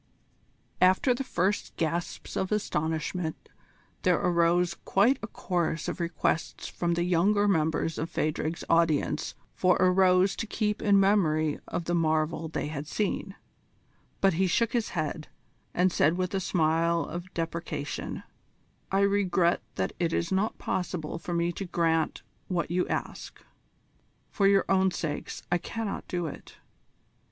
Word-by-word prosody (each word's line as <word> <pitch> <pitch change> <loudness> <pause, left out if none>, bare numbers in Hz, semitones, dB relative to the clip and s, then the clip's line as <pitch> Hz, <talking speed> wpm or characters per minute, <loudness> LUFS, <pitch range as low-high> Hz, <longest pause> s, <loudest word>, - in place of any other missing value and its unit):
After 185 +8 +5
the 245 - -3
first 195 -4 -1
gasps 170 +2 -3
of 190 - -1
astonishment 160 -3 -2 0.5
there - - +3
arose 175 0 +2
quite 230 +8 +3
a 220 - -4
chorus 175 -5 -2
of - - -4
requests 170 -1 -1
from 170 -1 -1
the 170 - +1
younger 195 +4 +3
members 160 -3 +1
of 160 - -2
Phadrig's 155 +2 -2
audience 160 -2 +1 0.2
for 180 -1 +3
a 185 - +4
rose 185 +1 +4
to 220 - -3
keep 210 0 -1
in 200 -2 +5
memory 160 -7 +2
of 170 - -3
the 175 - -1
marvel 160 -1 +1
they 160 - -3
had 150 -1 -5
seen; 195 +2 -2 0.9
but 195 -1 +4
he 185 +3 +2
shook 230 +6 +1
his 235 -3 0
head, 155 0 -2 0.4
and 180 +1 +2
said 165 +1 +2
with 185 0 -1
a 195 - +1
smile 165 -1 +2
of 175 +3 -7
deprecation: 165 -3 -4 0.7
"I 195 +1 +3
regret 190 -3 +2
that 95 - -1
it 170 -2 0
is 170 - -1
not 195 +3 0
possible 170 -3 -3
for 175 0 -4
me 170 0 +1
to 195 - -5
grant 165 -3 0 0.2
what 170 -3 -1
you 180 +1 +1
ask. - - -4 0.9
For 200 -2 +3
your 195 -1 +4
own 190 0 +3
sakes 165 -4 -4
I 175 - +3
cannot 220 +3 -4
do 175 -1 -2
it. 155 - -9
175 Hz, 145 wpm, -28 LUFS, 165-190 Hz, 0.9 s, After